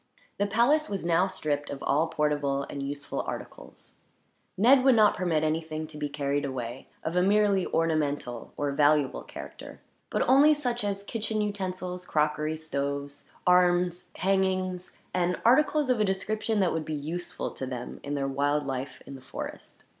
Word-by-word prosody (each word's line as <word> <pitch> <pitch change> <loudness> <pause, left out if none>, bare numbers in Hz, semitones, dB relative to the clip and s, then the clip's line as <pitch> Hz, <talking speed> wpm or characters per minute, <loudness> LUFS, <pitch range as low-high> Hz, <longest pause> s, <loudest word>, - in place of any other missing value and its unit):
The 205 - +2
palace 240 +9 +3
was 195 -4 -3
now 175 +2 +3
stripped 150 -6 -2
of 140 - -6
all 150 +4 +2
portable 145 -3 0
and 140 - -6
useful 140 +1 -3
articles. - - -8 0.6
Ned 255 +6 +6
would 265 -2 +6
not 215 -2 +5
permit 170 -4 0
anything 155 0 -1
to 155 -1 -10
be 145 -1 -2
carried 145 0 -1
away 130 -2 -5 0.2
of 165 - -3
a 180 - +4
merely 200 0 +3
ornamental 145 -7 -1
or 145 -1 0
valuable 145 -1 +3
character; - - -10 0.3
but - - +1
only 290 +4 +6
such 245 -6 -2
as 200 -1 -2
kitchen 220 +1 -2
utensils, 185 -3 -3
crockery, 150 +1 0
stoves, 140 -2 -4 0.2
arms, 180 0 +3
hangings, 185 -1 0 0.2
and 180 0 0
articles 295 +4 +4
of 245 - +1
a - - +4
description 210 +2 0
that 185 - +2
would 160 - -1
be 155 0 -4
useful 165 +5 -4
to 130 - -5
them, 125 -1 -6
in 145 0 -4
their 135 -1 -1
wild 145 +2 0
life 130 0 -5
in - - -9
the 135 - -10
forest. - - -8
165 Hz, 165 wpm, -28 LUFS, 145-195 Hz, 0.6 s, Ned